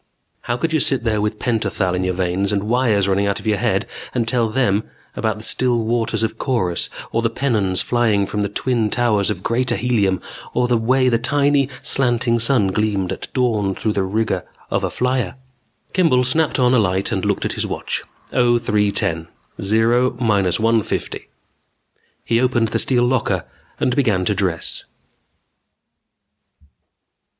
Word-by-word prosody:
How 120 0 -1
could 160 +5 -2
you 155 - +3
sit 135 -4 +1
there 110 -3 0
with 105 +1 -1
pentothal 110 -6 -1
in 90 0 -1
your 90 -1 -1
veins 95 +2 0
and 100 -1 0
wires 110 -3 +2
running 100 +1 +1
out 100 - -1
of - - -13
your 105 -2 +1
head - - 0 0.3
and 115 -2 0
tell 115 -2 +1
them 110 -3 +1 0.3
about 110 -2 -1
the 110 - -8
still 120 -1 +1
waters 115 0 0
of 110 0 -2
Korus, 95 -10 -1 0.2
or 115 - 0
the 115 - +1
pennons 110 -7 0
flying 110 -5 +1
from 105 +1 -3
the 100 - -1
twin 115 +1 0
towers 110 -4 +1
of 95 -3 -3
Greater 120 +1 0
Helium 105 -7 +1 0.4
or 125 0 +2
the 120 - +2
way 130 +3 +2
the 115 -2 +2
tiny, 140 +1 +2
slanting 120 -4 +1
sun 115 -4 +3
gleamed 100 -2 -1
at - - -8
dawn 110 -7 0
through 110 - -1
the 100 - 0
rigging 110 +4 -1 0.3
of - - 0
a - - 0
flyer? 125 -6 -1 0.6
Kimball 160 -9 +3
snapped 155 +5 +1
on 125 -1 +3
a 125 - +5
light 95 -1 0
and - - -1
looked - - 0
at - - -1
his - - -2
watch. - - -3 0.3
0310. 105 -8 +1 0.3
Zero 115 +5 +2
minus 100 -7 +1
one 115 0 +3
fifty. - - -4 1.0
He 115 +1 +2
opened 120 -3 +1
the - - 0
steel 125 -2 +2
locker 130 +1 0 0.3
and 125 - +1
began 105 -10 +1
to 105 - +2
dress. 95 -4 -2
115 Hz, 170 wpm, -20 LUFS, 100-125 Hz, 1.0 s, a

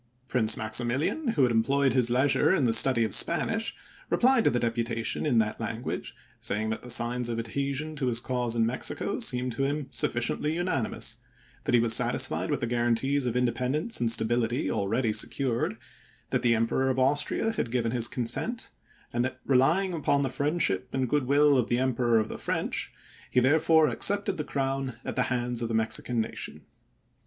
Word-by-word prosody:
Prince 115 -4 +3
Maximilian, 120 - -1
who 140 - +4
had 125 - +3
employed 135 +4 +2
his 125 -2 +2
leisure 130 +7 +2
in 145 - 0
the 115 -2 +2
study 115 0 +5
of 110 - -1
Spanish, 225 +6 +1 0.3
replied 255 -1 +3
to - - +4
the 120 - 0
deputation 115 +3 -1
in 125 -5 +2
that 110 -1 0
language, 115 +1 -5 0.2
saying 110 +2 -1
that 110 - -4
the 125 - -11
signs 120 0 0
of 115 - -3
adhesion 140 +6 -3
to 135 -3 -2
his 120 -2 +2
cause 120 -1 -2
in 115 -1 +2
Mexico 120 +3 -2
seemed 125 0 0
to 135 +4 -2
him 145 +1 -1
sufficiently 120 +6 0
unanimous; 170 -9 -2 0.5
that - - +2
he - - +5
was 115 -1 +5
satisfied - - +1
with - - -1
the - - 0
guaran 120 0 +1
tees 135 +2 -1
of 120 - -2
independence 130 - 0
and 115 -1 +3
stability 115 -2 +1
already 110 +4 0
secured; 115 0 -1 0.5
that - - 0
the 120 -1 +3
Emperor 115 +4 0
of 130 - -1
Austria 145 +11 +1
had 210 - -3
given 115 -1 -1
his 120 -1 +2
consent; 175 - -2 0.4
and 120 +1 +1
that, 130 0 -4
relying 160 +9 +2
upon 140 -3 +1
the 135 - -2
friendship 140 - -1
and 130 -2 -1
good 145 -2 0
will 145 0 +4
of 120 - -1
the 120 - +1
Emperor 125 -2 +1
of 110 -1 +1
the - - -8
French, - - -3 0.4
he - - +2
therefore 155 +4 +4
ac 125 - -3
cepted 200 -1 +1
the 150 - -2
crown 135 -2 -2
at - - -4
the 130 - +1
hands 120 -1 -1
of 115 - -1
the 115 - -2
Mexican 110 +2 -1
nation. 110 - -5
125 Hz, 190 wpm, -27 LUFS, 115-140 Hz, 0.5 s, study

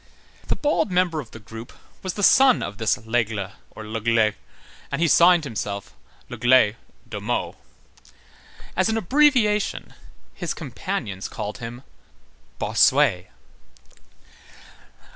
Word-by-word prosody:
The - - 0
bald 295 -7 0
member 180 -3 +1
of 125 -7 -7
the - - -11
group 115 +2 -10 0.3
was 185 -2 -4
the 205 - -3
son 265 +4 +6
of 100 +2 -6
this 110 - +1
Lesgle, 110 -3 -2 0.2
or 110 - -10
Légle, 110 0 +1 0.6
and 140 - -2
he 170 - +3
signed 170 +1 +5
himself, 105 -6 -5 0.3
Légle 120 -2 +3 0.3
[de - - -6
Meaux]. - - -2 1.2
As 185 +4 +2
an 220 - 0
abbreviation, 225 - +2 0.4
his 175 -3 -4
companions 125 - -5
called 105 +5 -6
him 120 +1 -8 0.7
Bossuet. 125 -11 +3
125 Hz, 115 wpm, -23 LUFS, 110-185 Hz, 1.2 s, son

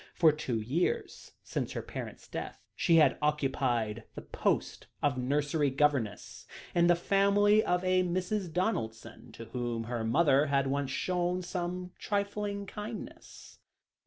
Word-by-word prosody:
For 160 -2 +6
two 135 -6 -2
years 165 - -2
since - - -3
her - - -4
parents' - - -7
death, - - -6 0.2
she 170 - +3
had 160 -2 +5
occupied 130 -7 0
the - - -7
post - - -1 0.2
of 145 -3 +2
nursery 145 +3 +1
governess 135 -6 -1 0.3
in 170 0 +4
the 175 - +6
family 200 +4 +4
of 180 +1 +1
a 185 0 +3
Mrs. 185 +1 -1
Donaldson, 115 - -3
to 115 - -9
whom 120 -1 -3
her 115 0 -3
mother 140 +4 +3
had 140 -1 +2
once 140 0 -1
shown 180 +5 -1
some 180 0 -4
trifling 200 0 -2
kindness. 210 +3 -9
155 Hz, 135 wpm, -31 LUFS, 130-185 Hz, 0.3 s, For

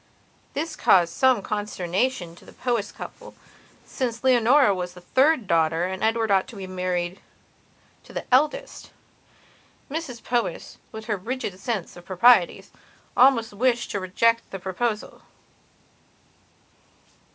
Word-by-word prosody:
This 315 +3 -3
caused 170 -3 +4
some 260 -6 +3
consternation 195 -1 -2
to - - -18
the - - -15
Powys 235 -5 -2
couple, - - -10 0.5
since 240 -3 -4
Leonora 255 -1 +5
was 180 -1 -5
the 180 - -12
third 265 - +2
daughter 165 -1 +2
and 190 +2 -3
Edward 225 -1 +1
ought 190 -1 +3
to 240 -5 -11
have 190 -1 -7
married 180 0 -2 0.9
the - - -6
eldest. 295 +4 +1 1.0
Mrs 275 -7 -5
Powys, 240 -1 -2
with 220 0 -8
her 215 -2 -1
rigid 205 -2 -5
sense 210 -5 -4
of 175 - -12
the - - -28
proprieties, 190 0 +4 0.4
almost 245 -4 +4
wished 240 +2 0
to 200 - -2
reject 230 +5 +1
the 195 - -6
proposal. 210 +4 -3
215 Hz, 130 wpm, -24 LUFS, 185-245 Hz, 1.0 s, Leonora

